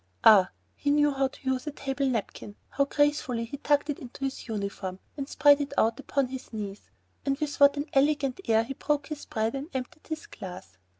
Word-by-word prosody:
Ah! 195 -4 +8 0.3
he 290 - -2
knew 295 0 +4
how 270 -1 +1
to 270 0 -13
use 260 +2 0
a - - -1
table 275 -1 -1
napkin! 210 -3 -4
How 280 - +1
gracefully 285 -5 +1
he 260 +5 -7
tucked 290 +1 +2
it 295 - -3
into 255 +2 -9
his 270 -1 -4
uniform, 200 -3 -4 0.2
and 280 -1 -5
spread 290 0 +5
it 280 0 -4
out 225 +3 +3
upon 275 -2 0
his 260 0 -7
knees. 205 -3 -6 0.3
And 275 -1 0
with 300 -1 -3
what 280 0 +7
an 285 - -1
elegant 280 +1 +2
air 225 0 +4
he 260 +4 -5
broke 295 +2 -1
his 305 -2 -6
bread 220 +1 -1
and 275 +3 -5
emptied 260 +4 -5
his 315 -1 -5
glass! 180 - -10
270 Hz, 205 wpm, -28 LUFS, 230-290 Hz, 0.3 s, Ah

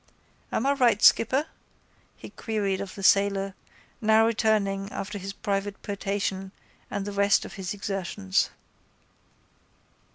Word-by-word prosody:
—Am 235 - -1
I 280 - +4
right, 240 -6 +3
skipper? 260 +7 +5 0.7
he - - -11
queried 200 -4 -2
of 195 -2 -7
the 195 - -8
sailor, 195 0 +3 0.5
now 220 0 +5
returning 210 -3 +1
after 205 +1 -5
his 195 +1 -5
private 200 0 -3
potation 195 -1 -3 0.4
and 200 - -3
the 205 - -4
rest 200 0 +3
of - - -9
his 190 -3 -5
exertions. 195 -1 -1
200 Hz, 125 wpm, -26 LUFS, 195-215 Hz, 0.7 s, skipper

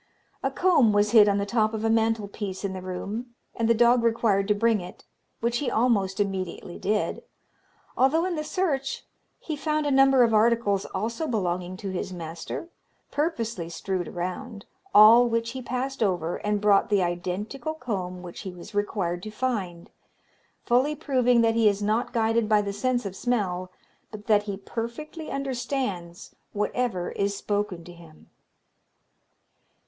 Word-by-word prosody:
"A - - 0
comb 310 - +3
was 205 0 +3
hid 215 -3 +7
on 200 - +2
the 200 - 0
top 215 0 +1
of 220 +1 -3
a - - +2
mantel 225 -2 +1
piece 200 -1 -5
in 190 - -2
the 185 - -6
room, 205 +6 -5 0.2
and 230 -1 0
the 230 - +5
dog 240 +1 +5
required 225 -4 +2
to 210 - +3
bring 225 -1 +2
it, 180 - -11 0.4
which 235 +1 0
he 280 - -1
almost 215 -6 +1
immediately 185 -3 -3
did, 210 +1 -1 0.7
although 300 +7 +3
in 370 - -1
the 305 -2 -2
search 300 -6 -2 0.3
he 315 - -5
found 305 0 -1
a 290 - +1
number 270 -1 +6
of 230 -1 +2
articles, 215 -3 +3
also 230 +10 -3
belonging 185 -5 -2
to 195 0 -5
his 185 0 -4
master, 170 - -6 0.4
purposely 230 - -2
strewed 180 +1 -3
around, 200 +5 -5 0.3
all 230 +3 +8
which 230 0 -1
he 260 +1 -6
passed 255 +2 -3
over, 175 -5 0
and 210 -1 -1
brought 205 -1 +4
the 200 -3 +3
identical 185 - -3
comb 185 - -4
which 175 -1 -9
he 190 - -6
was 180 +2 -12
required 195 -4 -1
to 215 - -6
find, 210 -7 -3 0.7
fully 260 +5 +2
proving 250 -5 +2
that 225 0 +3
he 225 -2 +4
is 205 0 -2
not 225 +4 0
guided 225 -1 +1
by 215 -1 +5
the 200 -1 -2
sense 245 +2 -1
of 195 -1 -5
smell, 190 -7 -1 0.4
but 210 -1 -10
that 210 -2 +4
he 195 - -3
perfectly 235 - -6
understands 250 -10 -4 0.2
whatever 210 -2 -1
is 200 0 -1
spoken 205 -5 -2
to 175 +1 -11
him. 165 -2 -17
215 Hz, 165 wpm, -26 LUFS, 190-245 Hz, 0.7 s, all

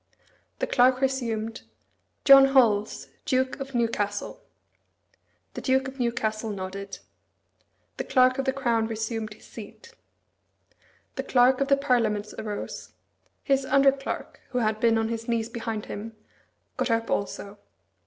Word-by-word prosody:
The - - -1
Clerk 255 0 +4
resumed, 230 -5 -2 0.6
"John 275 -1 +9
Holles, 230 -6 +2
Duke 260 +1 0
of 270 -1 -6
Newcastle." 225 - -1 1.1
The - - -6
Duke 265 0 +1
of 265 0 -9
Newcastle 225 -2 -1
nodded. 195 0 -6 1.0
The - - -2
Clerk 255 0 +3
of 270 - -1
the 265 - +2
Crown 235 -5 0
resumed 225 -1 -4
his - - -19
seat. 465 - -12 1.2
The - - -1
Clerk 255 +1 +4
of 275 - +2
the 275 0 +4
Parliaments 225 -6 0
arose. 210 -1 -6 0.5
His 275 -1 +2
under 275 +1 +5
clerk, 275 0 -6
who 250 - -3
had 215 -2 +1
been 230 0 +3
on 225 0 0
his 230 0 -4
knees 230 -1 -1
behind 225 -3 -4
him, 220 +2 -7 0.6
got - - 0
up 230 0 0
also. 200 0 -3
235 Hz, 135 wpm, -26 LUFS, 220-265 Hz, 1.2 s, John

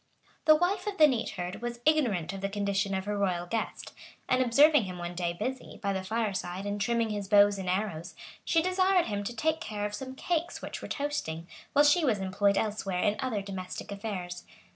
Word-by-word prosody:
The 310 - +8
wife 355 +6 0
of 405 -1 -3
the 310 - +8
neat 245 -5 0
herd 180 +4 -4
was 240 0 -4
ignorant 235 - +2
of 195 - -6
the 195 - -1
condition 200 -1 0
of 190 0 -2
her 205 0 -2
royal 185 -4 0
guest; 225 +4 -4 0.3
and 255 0 +3
observing 275 +1 +5
him 180 -1 -6
one 175 0 -5
day 175 -1 -1
busy, 250 +9 -5
by 200 -2 -1
the 190 -1 -2
fireside, 195 -3 -2
in 205 0 -2
trimming 230 +1 +1
his 205 -2 -3
bow 205 0 +7
and 185 -1 -3
arrows, 185 -4 -2 0.3
she 325 -1 +2
desired 370 0 +3
him 205 -2 -2
to 235 +4 -5
take 315 +6 0
care 205 -1 -3
of 205 - -4
some 260 +4 -6
cakes 340 +3 -2
which - - -6
were - - -6
toasting, 280 - -3 0.3
while 290 +1 +6
she 305 +4 +5
was 240 -8 +2
employed 195 +1 +1
elsewhere 200 -4 -1
in 205 0 +2
other 225 -6 -1
domestic 190 0 -6
affairs. 190 -4 -5
205 Hz, 205 wpm, -29 LUFS, 190-260 Hz, 0.3 s, The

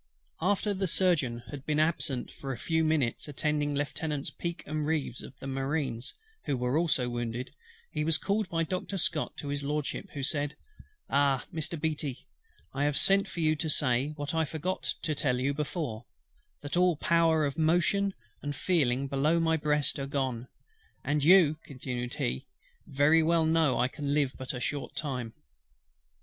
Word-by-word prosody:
After 205 +3 +1
the 190 0 -1
Surgeon 145 -10 +1
had 140 -2 -7
been 150 +1 0
absent 155 -5 0
a 135 -3 -3
few 160 +5 +1
minutes 155 -6 +1
attending 150 0 0
Lieutenants 145 0 -2
PEAKE 170 0 -5
and 155 +1 -2
REEVES 150 -5 -1
of 130 - -11
the - - -10
Marines, 135 -2 -2 0.3
who 140 - 0
were 125 +6 +1 0.3
wounded, 120 +2 -3 0.4
he 150 - -1
was 160 0 +3
called 205 0 0
by 165 -1 +1
Doctor 185 +3 -3
SCOTT 160 -3 0
to 145 - -5
HIS 145 0 -1
LORDSHIP, 145 +1 -2
who 140 - -3
said: 145 +1 0 0.5
"Ah, 140 -2 +2
Mr. 160 0 -2
BEATTY! 150 -4 -2 0.5
I 140 +2 0
have 145 -1 +2
sent 195 +1 +4
for 170 - -5
you 155 -1 +3
to 160 +1 -2
say, 130 -3 +3
what 145 0 -4
I 160 0 +2
forgot 160 +4 -3 0.2
to 155 - 0
tell 125 -3 0
you 135 +2 +1
before, 145 -6 -3 0.6
that 145 +2 -4
all 180 -1 +4
power 165 -1 +3
of 140 +2 -3
motion 175 +5 +2 0.3
and 145 0 -3
feeling 140 -6 +1
below 145 +5 +2
my 160 -1 +3
breast 150 -2 +1
are 135 - -3
gone; 130 -3 -2 0.6
and 145 0 0
you" 160 -2 +6
continued 125 -2 -4
he, 65 - -2 0.4
"very 145 +4 +4
well 165 0 +3
know 160 -5 +3
I 125 - +3
can 145 +1 -2
live 140 -3 +2
but 130 - -5
a - - -4
short 140 +4 -3
time." 125 -7 -3
145 Hz, 170 wpm, -30 LUFS, 135-160 Hz, 0.6 s, you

